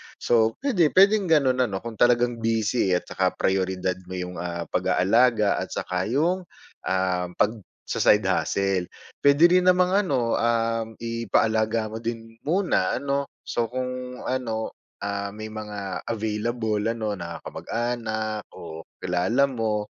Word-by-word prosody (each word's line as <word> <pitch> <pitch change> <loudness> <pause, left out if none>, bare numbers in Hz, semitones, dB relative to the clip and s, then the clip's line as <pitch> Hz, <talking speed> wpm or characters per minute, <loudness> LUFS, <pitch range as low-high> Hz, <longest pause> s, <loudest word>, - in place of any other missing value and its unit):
So 115 -1 +2
puwede, 190 - +3
puwedeng 200 0 +5
gano'n 130 -5 +3
ano 95 0 -5
kung 115 -2 -7
talagang 120 -1 +3
busy 110 -3 +1
at - - -1
saka - - -1
prayoridad 95 -1 0
mo 95 - -6
yung, 90 -1 -5
ah, 85 -1 -3
pag-aalaga 110 +3 +3
at - - -5
saka 90 +1 -2
yung, 170 +8 0 0.4
ah, 95 -1 0
pagsa-side 105 -1 +1
hustle. 95 -2 0 0.3
Puwede 145 +3 +4 0.2
rin 180 - -1
namang 180 0 +4
ano, 140 - +1
uhm, 115 -1 0
ipaalaga 110 -1 0
mo 110 - -5
din 115 0 -6
muna 185 +3 +1
ano, 140 0 -1 0.2
so 115 -1 -1
kung 125 +1 -5
ano, 115 -4 -2 0.3
ah, 100 0 -3
may 110 0 -7
mga 105 -3 -5
available 110 0 -1
ano 110 -2 -1
na 85 -1 -7
kamag-anak 110 -3 -3
o 80 +1 -9 0.2
kilala 105 +10 +2
mo 110 -3 -2
115 Hz, 135 wpm, -25 LUFS, 100-125 Hz, 0.4 s, puwedeng